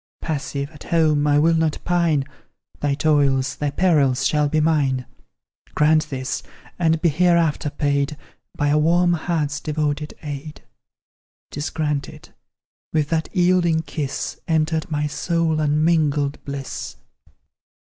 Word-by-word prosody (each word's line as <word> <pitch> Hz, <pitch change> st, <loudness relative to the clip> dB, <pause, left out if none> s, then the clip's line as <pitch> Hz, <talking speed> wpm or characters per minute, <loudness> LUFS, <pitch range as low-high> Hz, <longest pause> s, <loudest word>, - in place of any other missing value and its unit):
Passive, 140 Hz, -2 st, -3 dB
at 150 Hz, -, -13 dB
home, 155 Hz, -3 st, +2 dB
I 145 Hz, 0 st, +4 dB
will 165 Hz, +3 st, +4 dB
not 160 Hz, -2 st, +1 dB
pine; 170 Hz, -5 st, +2 dB, 0.6 s
Thy 145 Hz, -1 st, 0 dB
toils, 140 Hz, -3 st, +2 dB
thy 150 Hz, -, -1 dB
perils 140 Hz, -5 st, +2 dB
shall 150 Hz, -1 st, +2 dB
be 155 Hz, -, +1 dB
mine; 140 Hz, -5 st, +1 dB, 0.7 s
Grant 155 Hz, 0 st, +3 dB
this 130 Hz, -1 st, -3 dB, 0.4 s
and 165 Hz, -2 st, +2 dB
be 170 Hz, -, +5 dB
hereafter 165 Hz, -1 st, +2 dB
paid 140 Hz, 0 st, -1 dB, 0.4 s
By 145 Hz, -, +1 dB
a 150 Hz, +1 st, +3 dB
warm 175 Hz, +3 st, +3 dB
heart's 155 Hz, -3 st, -1 dB
devoted 150 Hz, 0 st, -2 dB
aid: 145 Hz, 0 st, -7 dB, 0.9 s
'Tis 145 Hz, +2 st, -3 dB
granted 150 Hz, -3 st, -3 dB, 0.6 s
with 150 Hz, -2 st, 0 dB
that 160 Hz, -1 st, -1 dB
yielding 175 Hz, -3 st, +2 dB
kiss, 145 Hz, -4 st, -4 dB
Entered 160 Hz, +1 st, 0 dB
my 150 Hz, -1 st, -1 dB
soul 165 Hz, +1 st, 0 dB
unmingled 150 Hz, -1 st, +1 dB
bliss. 140 Hz, -1 st, -6 dB
150 Hz, 125 wpm, -22 LUFS, 145-160 Hz, 0.9 s, be